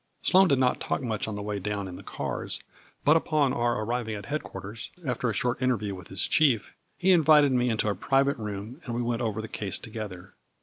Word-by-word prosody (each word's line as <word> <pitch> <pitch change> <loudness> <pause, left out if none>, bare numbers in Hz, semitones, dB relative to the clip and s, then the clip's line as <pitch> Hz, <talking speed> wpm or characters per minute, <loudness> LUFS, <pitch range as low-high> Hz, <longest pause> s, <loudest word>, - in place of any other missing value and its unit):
Sloane 190 +1 +6
did 140 -5 +3
not 125 -1 +2
talk - - -2
much 110 -4 -2
on 110 - -3
the 105 - -4
way 105 -1 -2
down 100 0 -3
in 90 - -7
the - - -9
cars, - - -4 0.5
but 150 - +6
upon 150 -4 +2
our 120 -2 +1
arriving 115 -1 -2
at 100 -1 -7
head 150 +6 -2
quarters, 105 +3 -8 0.2
after 125 -2 0
a - - -1
short 125 +4 -1
interview 110 -6 0
with 90 -2 -9
his 95 -1 -1
chief, 135 -9 +3 0.2
he 190 +2 +3
invited 155 -4 +6
me 125 -1 +2
into 110 -2 0
a 105 - +2
private 135 +8 +2
room 105 - -6
and 120 -3 -3
we 120 - 0
went 120 +1 -1
over 110 -2 -2
the - - -5
case 100 -2 -3
together. 100 -4 -8
115 Hz, 225 wpm, -27 LUFS, 105-135 Hz, 0.5 s, Sloane